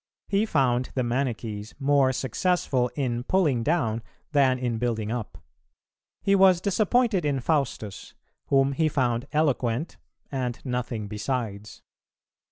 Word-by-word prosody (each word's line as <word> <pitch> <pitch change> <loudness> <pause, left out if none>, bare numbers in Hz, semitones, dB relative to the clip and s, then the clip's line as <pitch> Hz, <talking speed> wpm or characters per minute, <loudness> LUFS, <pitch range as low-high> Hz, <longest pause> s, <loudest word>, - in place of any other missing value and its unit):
He 205 +2 +2
found 130 - +1
the 130 - +1
Manichees 120 -3 -3
more 140 -1 +3
successful 130 - 0
in 125 -4 -1
pulling 150 -7 +2
down 115 -6 0 0.3
than 135 -3 +4
in 120 -3 -2
building 110 -3 -1
up; 120 -3 -4 0.9
he 195 - +3
was 190 -2 +6
disappointed 210 +1 +2
in 145 -2 0
Faustus, 125 - -2 0.3
whom 135 0 +3
he 155 +3 +1
found 125 -3 0
eloquent 140 -2 0 0.3
and 125 -3 -2
nothing 125 -4 -3
besides. 105 -1 -4
130 Hz, 120 wpm, -26 LUFS, 120-150 Hz, 0.9 s, was